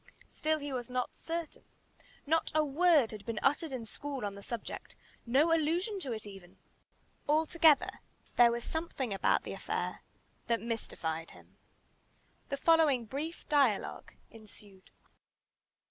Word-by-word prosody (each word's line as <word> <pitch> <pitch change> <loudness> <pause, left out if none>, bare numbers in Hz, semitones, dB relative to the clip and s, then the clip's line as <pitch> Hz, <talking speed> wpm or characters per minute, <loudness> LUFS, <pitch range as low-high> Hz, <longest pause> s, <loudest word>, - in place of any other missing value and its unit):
Still 310 0 0
he 290 -2 -5
was 250 -1 -4
not 250 0 -2
certain. 335 -1 -5 0.6
Not 320 +2 +1
a 310 -1 +4
word 300 -3 +4
had 210 -2 -8
been 230 0 -4
uttered 295 +3 +2
in 250 -3 -4
school 275 +1 -5
on 200 - -3
the 200 - -10
subject 235 +2 -6 0.3
no 290 +7 +4
allusion 345 +6 +1
to 275 -9 -5
it 220 -2 -4
even. 195 -3 -12 0.7
Altogether 315 0 +4 0.4
there 240 -1 +7
was 235 0 -3
something 300 -8 -3
about 195 - +2
the - - -5
affair - - -3 0.5
that 230 -1 +2
mystified 165 -8 -4
him. - - -19 0.9
The 280 - -2
following 305 -7 +4
brief 295 +8 -5
dialogue 275 -9 +1 0.2
ensued. 205 -3 -15
270 Hz, 135 wpm, -32 LUFS, 225-315 Hz, 0.9 s, there